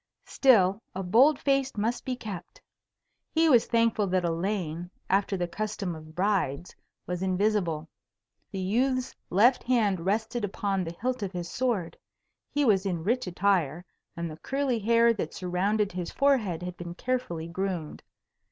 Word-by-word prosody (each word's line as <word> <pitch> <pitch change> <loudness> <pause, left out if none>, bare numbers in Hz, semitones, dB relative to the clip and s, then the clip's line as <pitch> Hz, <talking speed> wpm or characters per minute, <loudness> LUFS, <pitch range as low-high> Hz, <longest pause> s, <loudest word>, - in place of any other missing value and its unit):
Still, 210 -6 +4
a 190 - -3
bold 255 +11 +5
face 275 -3 0
must 230 +4 -1
be 255 - -1
kept. 215 - -8 0.7
He 325 0 +3
was 240 -5 +5
thankful 230 -3 +2
that 185 -1 +1
Elaine, 170 -1 -2 0.2
after 195 0 +2
the 175 -1 -1
custom 205 -1 -3
of 155 0 -11
brides, 180 -6 0 0.3
was 180 0 -3
invisible. 185 -4 0 0.6
The 195 - -4
youth's 255 +6 0 0.2
left 235 +7 +4
hand 220 -7 +2
rested 220 +4 -1
upon 200 -1 -1
the 165 0 -6
hilt 255 +1 -1
of 195 -2 -3
his 175 -1 -5
sword; 230 -10 -1 0.5
he 290 -1 +1
was 200 -5 +4
in 175 -5 -2
rich 235 +3 0
attire, 180 -3 +1 0.3
and 170 0 -2
the 155 -1 -8
curly 270 - -1
hair 230 +2 +4
that 180 -8 -4
surrounded 195 +3 0
his 180 -1 -4
forehead 225 -12 +1
had 180 0 -6
been 170 0 -7
carefully 180 -10 -2
groomed. 180 -3 -4
195 Hz, 150 wpm, -28 LUFS, 175-235 Hz, 0.7 s, bold